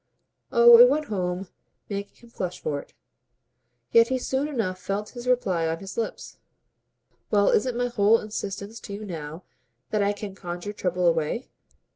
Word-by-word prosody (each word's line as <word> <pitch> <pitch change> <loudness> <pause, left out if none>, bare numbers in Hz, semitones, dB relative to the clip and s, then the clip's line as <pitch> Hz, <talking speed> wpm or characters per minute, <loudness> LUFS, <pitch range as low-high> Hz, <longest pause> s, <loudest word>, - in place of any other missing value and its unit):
Oh 235 0 +8
it 245 +1 +10
went 305 +3 0
home, 180 0 -2 0.4
making 200 0 -5
him 235 - -18
flush 180 -5 -4
for 145 -2 -2
it; - - -14 1.0
yet 230 0 +6
he 260 +1 0
soon 265 +3 -1
enough 215 -11 -2
felt 205 +2 -3
his 245 0 -9
reply 190 -10 +1
on 160 0 -1
his 195 +2 -9
lips. 230 - -5 0.9
"Well, 205 -1 +4
isn't 245 +1 +1
my 245 - +1
whole 220 -1 +4
insistence 210 +1 -6
to 200 - -9
you 210 +2 -6
now 160 -2 -7 0.5
that 215 - +1
I 200 0 +2
can 205 -1 -7
conjure 180 +2 -6
trouble 180 -3 -1
away?" 165 +8 0
205 Hz, 165 wpm, -25 LUFS, 180-235 Hz, 1.0 s, it